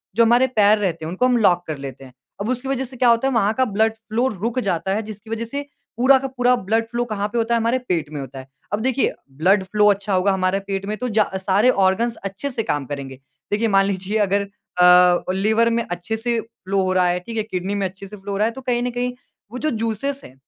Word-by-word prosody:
जो 230 - +5
हमारे 240 +3 +5
पैर 215 -4 +4
रहते 170 -6 -2
हैं - - -4
उनको 185 +9 0
हम 255 -1 +3
लॉक 180 -5 +3
कर 155 - -4
लेते 135 -1 -8
हैं। 130 -1 -14 0.3
अब 210 - -2
उसकी 255 +1 -2
वज़ह 265 -1 -1
से 255 +1 -12
क्या 245 0 +4
होता 235 +3 +3
है 270 - 0
वहाँ 215 -2 +2
का 260 +3 +2
ब्लड 220 0 +1
फ़्लो 225 +3 -2
रुक 225 +2 -2
जाता 190 +2 0
है 215 - -1
जिसकी 215 +1 -10
वज़ह 225 +1 -3
से 280 +5 -4 0.4
पूरा 265 +3 +6
का 270 - -3
पूरा 250 -1 +2
ब्लड 225 +2 0
फ़्लो 240 0 -1
कहाँ 210 -3 -2
पे 225 +3 -4
होता 230 +1 +1
है - - +2
हमारे 230 +3 +1
पेट 160 -4 0
में 150 - -5
होता 135 0 -8
है। 130 - -11 0.3
अब 205 - +1
देखिए 260 +2 +1 0.3
ब्लड 190 +5 +3
फ़्लो 210 +2 +2
अच्छा 200 0 -2
होगा 190 +2 +3
हमारे 190 0 +1
पेट 195 0 -2
में 210 +1 -3
तो 250 +2 -3
जै 215 -1 +3
सारे 195 +5 +2
ऑर्गन्स 210 +2 +2
अच्छे 200 +8 -4
से 230 -3 -2
काम 145 -8 -2
करेंगे। 135 -1 -7 0.3
देखिए 215 +2 +1
मान 195 -1 +4
लीजिए 195 +2 -2
अगर 200 0 +2 0.4
अ, 180 0 +6
लिवर 220 +4 +2
में 235 0 0
अच्छे 175 +6 -3
से 235 0 -1
फ़्लो 200 -4 -3
हो 185 0 0
रहा 185 -1 +3
है, 175 0 +1
ठीक 225 +5 -7
है, 215 - +1
किडनी 190 -1 -3
में 200 -2 0
अच्छे 190 +2 -11
से 210 - -10
फ़्लो 200 +1 -7
हो 195 - -2
रहा 215 - +2
है - - -2
तो 265 - -9
कहीं 245 -1 0
न 250 - 0
कहीं 245 0 -1 0.4
वो 250 - -6
जो 310 - 0
जूसेज़ 230 +5 -2
है, 130 - -13
210 Hz, 265 wpm, -21 LUFS, 190-235 Hz, 0.4 s, पूरा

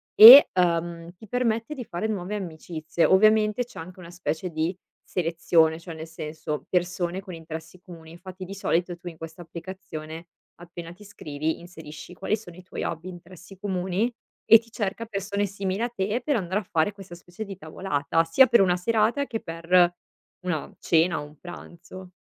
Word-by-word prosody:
e, 245 +6 +12
uhm, 170 -1 0
ti 215 +5 -14
permette 230 +2 -1
di 250 -4 -6
fare 180 +3 -3
nuove 205 -1 -3
amicizie. 165 -3 -2
Ovviamente 215 +3 +4
c'è 245 - -12
anche 185 +3 -10
una 170 -1 -11
specie 175 0 -3
di 160 +2 -2 0.3
selezione, 165 -1 +1
cioè 165 0 -9
nel 160 +1 -8
senso: 155 -1 -6
persone 180 0 -1
con 190 -2 -10
interessi 160 +1 -9
comuni. 165 -3 -13
Infatti 185 +2 -10
di 190 - -8
solito 175 -2 -1
tu 175 - -12
in 165 -2 -8
questa 165 +2 -9
applicazione 165 -2 -8 0.4
appena 170 -1 -9
ti 185 - -16
iscrivi, 155 -6 -4
inserisci 160 -1 -11
quali 180 +5 -1
sono 175 -6 -13
i 180 - -12
tuoi 185 - -6
hobby, 165 +2 -4
interessi 180 +1 -13
comuni, 190 +4 -1 0.3
e 225 - +9
ti 230 +1 -20
cerca 220 0 -3
persone 200 -1 -2
simili 195 +1 -3
a 240 - +1
te 210 +1 -2
per 290 - +1
andare 190 0 -1
a - - -13
fare 165 +1 0
questa 195 -3 -11
specie 175 +5 -9
di 195 -1 -7
tavolata, 160 -2 -1
sia 210 +11 +6
per 235 - +5
una 180 -2 +3
serata 225 +7 +1
che 225 - -3
per 175 +1 +2 0.5
una 165 -5 -3
cena 165 0 +2
o - - -7
un 150 +1 -16
pranzo. 180 +1 -11
180 Hz, 180 wpm, -25 LUFS, 165-200 Hz, 0.5 s, e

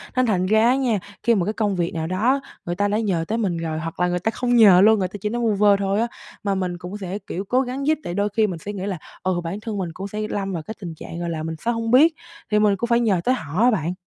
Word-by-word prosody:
Nên 255 0 +3
thành 190 -6 +1
ra 220 +3 +4
á 250 - +4
nha, 245 -7 +1 0.2
khi 235 0 +4
mà 185 -4 +1
cái 210 - -1
công 210 -2 0
việc 175 -1 -1
nào 160 -1 -3
đó 225 +10 +1 0.3
người 175 - -2
ta 205 +2 +1
đã 210 +2 0
nhờ 185 -7 0
tới 225 - -1
mình 190 -7 -1
rồi 160 -1 -3
hoặc 165 +1 -6
là 180 - +3
người 180 0 -1
ta 220 +5 -1
không 245 +1 0
nhờ 195 -5 +8
luôn, 215 0 +6
người 185 - 0
ta 200 +3 -8
chỉ 210 - -1
nói 240 +2 -2
vu 225 -2 +2
vơ 205 0 +5
thôi 200 +1 0
á, 235 - +1 0.4
mà 200 -1 0
mình 180 -2 -2
cũng 180 +3 -7
sẽ, 195 0 -5
kiểu, 190 +3 -4
cố 250 +6 +2
gắng 270 +3 -3
giúp. 310 - +3
Tại 175 - -4
đôi 200 +2 0
khi 215 +1 +2
mình 180 -4 -5
sẽ 205 +6 -6
nghĩ 195 -1 -4
là, 195 -3 -3 0.3
ừ, 185 -2 0
bản 175 +5 -4
thân 220 -2 -4
mình 185 -3 -2
cũng 195 +4 -6
sẽ 210 +1 -6
lâm 195 -1 -2
vào 165 -3 -4
cái 220 - -6
tình 170 -3 -6
trạng, 165 +2 -8
gọi 170 0 -3
là, 160 -2 -3
mình 160 0 -4
sẽ 235 - +2
hông 230 -1 -2
biết 305 +7 +6 0.4
thì 210 - +4
mình 210 -1 +4
cũng 235 +5 -3
phải 235 0 +3
nhờ 205 -7 +2
tới 255 - +3
họ 165 - -3
á 250 - +6
bạn. 175 -5 -1
200 Hz, 320 wpm, -22 LUFS, 180-225 Hz, 0.4 s, nhờ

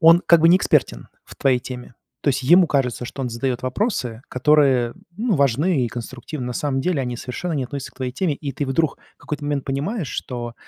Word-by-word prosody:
Он 165 +2 +7
как 170 -2 +6
бы 165 - +6
не 185 - +6
экспертен - - +1 0.2
в - - -14
твоей 130 -3 +3
теме. 125 -1 -8 0.3
То - - -1
есть 135 -1 +1
ему 175 +7 +6
кажется, 125 -5 0
что 135 - -6
он 125 - -2
задает 125 +2 -2
вопросы, 130 - -1
которые, 130 -3 +3 0.2
ну 220 -1 +1
важны 140 +1 +2
и - - -4
конструктивны. 125 +3 -6
На 125 - -3
самом 135 +1 -1
деле, 180 -6 0
они 125 -2 -3
совершенно 130 +9 -4
не 135 -4 -1
относятся 140 +1 -6
к - - -33
твоей 130 -1 -3
теме, 155 +1 0
и 140 -1 -5
ты 145 - -3
вдруг 145 +2 0 0.2
в - - -43
какой-то 150 0 -5
момент 145 -2 -1
понимаешь, 150 - -2
что 120 -2 -5
135 Hz, 220 wpm, -22 LUFS, 125-155 Hz, 0.3 s, Он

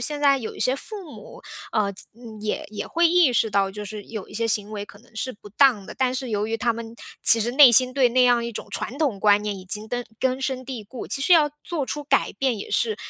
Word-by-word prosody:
现 295 +4 +2
在 280 -1 +4
有 230 - -7
一 - - -10
些 255 - +2
父 380 +1 -9
母， - - -12 0.3
呃， 200 -2 +1 0.5
也 210 0 -3
也 210 - -5
会 340 +1 +2
意 340 -5 +4
识 225 -2 +1
到， 195 -1 +1
就 210 +1 -7
是 205 0 -8
有 215 -4 -7
一 - - -16
些 230 +1 -1
行 210 -1 0
为 205 -1 -5
可 205 - -15
能 235 -1 -25
是 255 +3 -3
不 205 0 -15
当 235 -2 +3
的， - - -10
但 255 -1 0
是 255 -2 -4
由 210 0 -1
于 225 +1 -2
他 235 0 0
们 230 0 -8 0.3
其 230 - +6
实 230 +2 0
内 265 0 +8
心 255 +2 +5
对 270 -2 +4
那 255 +2 +3
样 240 -1 +3
一 235 - -5
种 - - -7
传 250 - -4
统 275 -11 0
观 205 0 +4
念 205 -2 -3
已 185 - -11
经 210 +3 -5
根 245 +1 -3 0.2
根 260 0 0
深 260 -1 -2
蒂 250 -5 -6
固， 235 +4 -8
其 275 - -2
实 360 - +3
要 305 -3 +5
做 320 -5 -2
出 295 0 -5
改 275 -1 +2
变 260 -4 -1
也 - - -8
是 220 -3 +1
235 Hz, 285 characters per minute, -23 LUFS, 210-270 Hz, 0.5 s, 内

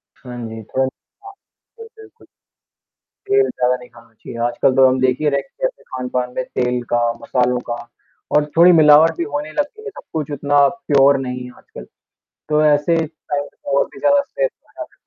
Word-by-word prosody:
हाँ 125 -2 -10
जी, 110 0 -8
थोड़ा 130 +5 -1
म - - -2 0.9
जी, - - -8
बिल्कुल। 440 +1 -17 1.0
तेल 410 0 +3
ज़्यादा 125 0 0
नहीं 125 -1 -12
खाना 115 -1 -19
चाहिए, 115 +2 -11
आजकल 130 +2 +1
तो 135 0 +6
हम 130 0 +1
देखिए 130 +4 +1
रेस्टोरेंट्स - - -3
में - - -23
खान-पान 125 -1 -3
में 130 - -1
तेल 125 0 -2
का, 120 0 +2 0.2
मसालों 125 -1 0
का 120 - -1 0.6
और 150 - +2
थोड़ी 175 +2 +8
मिलावट 160 0 +6
भी 170 - -1
होने 150 +1 -3
लग 295 - 0
गई 435 +9 -17
है, 440 - -6
सब - - -13
कुछ 155 -2 -3
उतना 145 0 +3
प्योर 140 -11 +3
नहीं 125 0 -5
है 125 - -10
आजकल। - - -12 0.7
तो 150 0 +2
ऐसे 150 +3 +3
टाइम 145 -2 -5
पे - - -11
और - - +3
भी - - -11
ज़्यादा 285 -1 +4
स्ट्रेस - - -2 0.2
आ - - -26
जाता - - -11
145 Hz, 190 wpm, -19 LUFS, 125-165 Hz, 1.0 s, थोड़ी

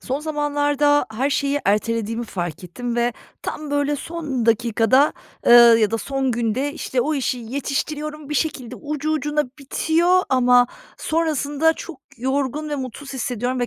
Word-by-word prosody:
Son 270 +3 -3
zamanlarda 290 -2 +1
her 265 +6 0
şeyi 280 +1 0
ertelediğimi 225 +2 0
fark 175 -4 -5
ettim 240 +7 -5
ve 240 0 +1 0.3
tam 300 -1 -5
böyle 290 0 +1
son 285 -6 -4
dakikada, 235 +4 +3 0.3
ııı, 235 -1 +8
ya 215 -2 +2
da 225 - -1
son 270 +2 -1
günde, 240 +5 -1
işte, 260 -4 -2
o 305 +6 0
işi 260 -2 -1
yetiştiriyorum, 290 +4 -4
bir 300 - -3
şekilde 260 -5 -2
ucu 300 +2 -3
ucuna 300 -1 0
bitiyor 335 +6 +2
ama 250 -1 +5 0.3
sonrasında 315 -1 +1
çok 320 -3 -9 0.2
yorgun 270 +4 -2
ve 295 - -2
mutsuz 270 +1 -7
hissediyorum 250 -1 -2
ve 245 - +1
275 Hz, 150 wpm, -21 LUFS, 240-295 Hz, 0.3 s, ııı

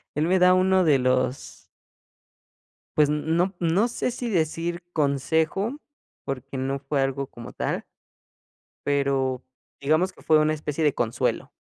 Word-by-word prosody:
él 155 +2 +1
me 185 +1 +3
da 180 0 +6
uno 185 0 +4
de 145 -5 +4
los 130 +1 -1 1.3
pues, 150 -1 +4
n 150 0 0
no, 180 +3 +1
no 180 +7 +2
sé, 245 +1 -2
si 245 0 -4
decir 170 -1 -1
consejo, 160 - 0 0.5
porque 135 0 -5
no 135 +1 -2
fue 135 +1 -1
algo 135 0 -1
como 120 - -10
tal - - -3 1.0
pero 135 -2 0 0.4
digamos 155 +6 +2
que - - -18
fue 155 -1 +4
una 155 0 +2
especie 150 +1 -3
de 150 - +3
consuelo. 115 -1 -1
150 Hz, 145 wpm, -25 LUFS, 135-175 Hz, 1.3 s, da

